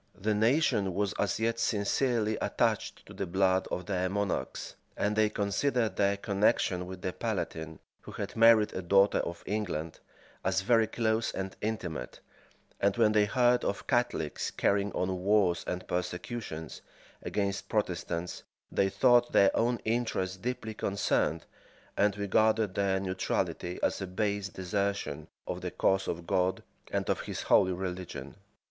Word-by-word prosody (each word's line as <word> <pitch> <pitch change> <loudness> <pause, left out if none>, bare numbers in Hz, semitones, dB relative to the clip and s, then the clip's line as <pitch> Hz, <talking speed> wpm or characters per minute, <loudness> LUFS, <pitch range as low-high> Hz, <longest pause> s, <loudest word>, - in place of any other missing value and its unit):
The 105 +2 +1
nation 105 - +2
was 100 -1 0
as 100 0 0
yet 115 +1 0
sincerely 110 +1 +1
attached - - 0
to - - -12
the 100 - -4
blood 95 +1 +2
of 90 - -3
their 95 -1 -1
monarchs, 100 0 -2 0.2
and 105 +1 0
they 110 0 +3
considered 110 +1 0
their 100 0 +2
connection 100 -3 +1
with 95 -1 -8
the 90 - -2
palatine, 80 -1 -3 0.2
who - - -11
had - - -5
married 115 -2 +6
a 95 - -3
daughter 95 +3 +4
of 85 0 -4
England, 90 -6 -3 0.4
as - - +1
very 115 +2 +3
close 110 0 0
and 95 0 -5
intimate; 90 - -4 0.6
and 100 +1 +2
when 110 -2 +4
they 105 -1 +4
heard 125 +2 +3
of 100 - -2
Catholics 120 - 0
carrying 100 0 +1
on 90 0 -1
wars 95 -3 +3
and 90 0 -4
persecutions 90 -1 -4 0.4
against 100 -1 -2
Protestants, 90 -4 -2 0.3
they 95 - +2
thought 120 +2 +4
their 100 - +5
own 120 +1 +2
interest 105 -5 -1
deeply 120 -3 -3
concerned, 95 -6 0 0.5
and 100 0 +2
regarded 110 +1 +2
their 95 -1 +1
neutrality 95 -1 -2
as - - +1
a 95 - -3
base 100 +1 -1
desertion 95 -5 -2 0.2
of - - -4
the - - -3
cause 95 0 +1
of 85 0 -3
God, 95 0 0 0.3
and - - -1
of - - +1
his - - -5
holy 95 -1 +4
religion. 90 0 -5
100 Hz, 150 wpm, -30 LUFS, 95-110 Hz, 0.6 s, married